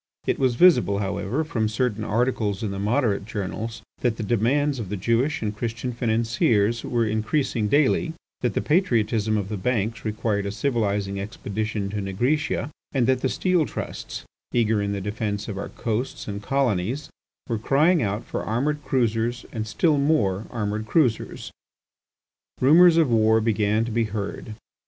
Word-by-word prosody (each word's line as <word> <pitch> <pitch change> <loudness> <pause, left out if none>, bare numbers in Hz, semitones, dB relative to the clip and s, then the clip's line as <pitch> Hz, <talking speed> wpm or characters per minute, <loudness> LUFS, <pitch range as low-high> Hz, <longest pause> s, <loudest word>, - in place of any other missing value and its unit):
It - - 0
was 130 -3 +2
visible, 120 - +5
however, 100 +7 -1
from 115 -9 -1
certain 110 -1 -1
articles 110 -2 0
in 105 - -2
the 100 - -4
Moderate 105 -1 +1
journals, 110 +2 -5 0.2
that 120 -3 0
the 115 - -3
demands 130 +6 +1
of 105 -5 -5
the 105 - -3
Jewish 115 +8 0
and 105 -1 -2
Christian 120 +3 -3
financiers 115 -1 +1
were 120 -1 0
increasing 110 +1 0
daily, 145 +6 +2 0.3
that 120 -5 -1
the - - 0
patriotism 115 - +2
of 100 -2 -2
the 105 0 -4
banks 115 +1 -1
required 105 -2 -1
a - - -2
civilizing 105 -4 -1
expedition 105 0 -3
to 105 0 -2
Nigritia, 125 +10 -1 0.2
and 130 -4 +2
that 130 +1 +2
the 130 - +1
steel 180 -1 +1
trusts, - - -6 0.3
eager 110 -3 +2
in 100 0 -1
the 100 -1 -3
defence 105 0 -3
of 100 -3 -4
our - - -5
coasts 115 +3 -3
and 100 -1 -4
colonies, 130 +1 -1 0.4
were 115 -3 -1
crying 150 +9 +3
out 105 +1 -2
for - - -4
armoured 145 +7 -1
cruisers 120 -2 0
and 110 -1 -4
still 150 +5 +2
more 110 -10 +1
armoured 110 -1 -3
cruisers. 125 -3 0 1.1
Rumours 165 +5 +7
of 155 -7 +3
war 110 0 +4
began 110 0 +1
to 120 - -5
be 115 +1 +1
heard. 105 +1 -5
115 Hz, 160 wpm, -24 LUFS, 105-130 Hz, 1.1 s, Rumours